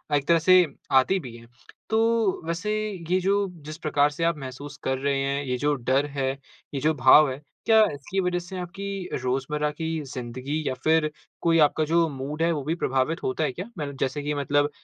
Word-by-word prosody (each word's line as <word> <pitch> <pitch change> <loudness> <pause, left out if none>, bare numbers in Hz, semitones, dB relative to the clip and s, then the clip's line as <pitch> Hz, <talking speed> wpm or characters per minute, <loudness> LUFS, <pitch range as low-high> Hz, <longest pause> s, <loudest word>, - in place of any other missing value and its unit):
एक 140 -1 0
तरह 170 -1 +5
से 185 -1 +8 0.3
आती 135 +9 +4
भी 125 -8 -9
है। 115 0 -15 0.4
तो 225 -2 +2
वैसे 175 +6 -2 0.4
ये 185 - +3
जो 200 +1 +2 0.2
जिस 155 +1 -7
प्रकार 150 -3 +2
से 155 +3 -4
आप 165 -2 +1
महसूस 140 +2 -8
कर 130 0 0
रहे 140 0 0
हैं, 140 +1 -1
ये 125 -1 -1
जो 145 +3 +1
डर 130 +3 +1
है, 135 -2 -2 0.4
ये 135 - -1
जो 155 +1 +3
भाव 135 +2 +6
है, 135 +3 -7 0.2
क्या 220 -1 +6
इसकी 145 +7 -7
इस 190 - +3
वज़ह 180 0 0
से 175 +2 -8
आपकी 195 +1 -5
रोज़मर्रा 135 +4 -1
की 160 +1 -3
ज़िन्दगी 130 +5 -4
या 130 - 0
फिर 160 -1 +3 0.3
कोई 165 -1 +3
आपका 155 +1 0
जो 165 +1 +3
मूड 140 +3 -5
है 170 - +3
वो 150 -4 -2
भी 155 +4 -1
प्रभावित 135 0 0
होता 130 +4 -1
है 150 - 0
क्या? 180 +9 -6
मल 145 -3 -3
जैसे 135 +2 -1
कि 150 - -1
मतलब 145 +1 +1
150 Hz, 210 wpm, -25 LUFS, 135-170 Hz, 0.4 s, से